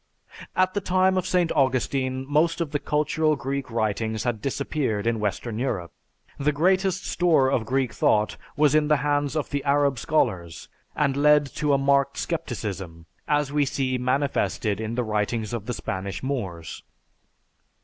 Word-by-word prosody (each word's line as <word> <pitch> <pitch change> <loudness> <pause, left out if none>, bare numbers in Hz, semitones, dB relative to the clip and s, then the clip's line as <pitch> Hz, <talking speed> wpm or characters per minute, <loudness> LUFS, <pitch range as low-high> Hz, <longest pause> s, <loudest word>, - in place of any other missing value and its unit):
At 185 0 +2
the 205 - -1
time 185 0 +2
of 185 -1 0
St. 180 -2 +2
Augustine 130 -1 0
most 155 +4 +2
of 165 -4 -2
the 145 - 0
cultural 155 +1 +1
Greek 135 +1 -4
writings 110 -1 -1
had 120 -4 -2
disappeared 135 -6 -2
in 115 -1 +1
western 105 +2 -2
Europe. 100 -10 -2 0.5
The 145 +2 +2
greatest 185 +5 +1
store 155 -7 +3
of 115 -5 0
Greek 130 -2 0
thought 105 0 +2 0.2
was 150 -1 +4
in 155 -1 +3
the 150 0 +4
hands 145 0 +1
of 155 - -2
the 140 -1 -1
Arab 140 -2 +2
scholars 85 - -1 0.3
and 140 -3 +1
led 150 +1 +5
to 150 -1 +1
a - - +4
marked 140 0 +2
scepticism, 95 - -4 0.2
as 145 -1 +1
we 150 -1 +3
see 130 -2 -1
manifested 125 -5 0
in 110 +1 -3
the 125 - 0
writings 110 +1 -1
of 110 -3 -4
the 125 - -2
Spanish 95 +3 -4
Moors. 90 - -4
135 Hz, 160 wpm, -25 LUFS, 115-150 Hz, 0.5 s, led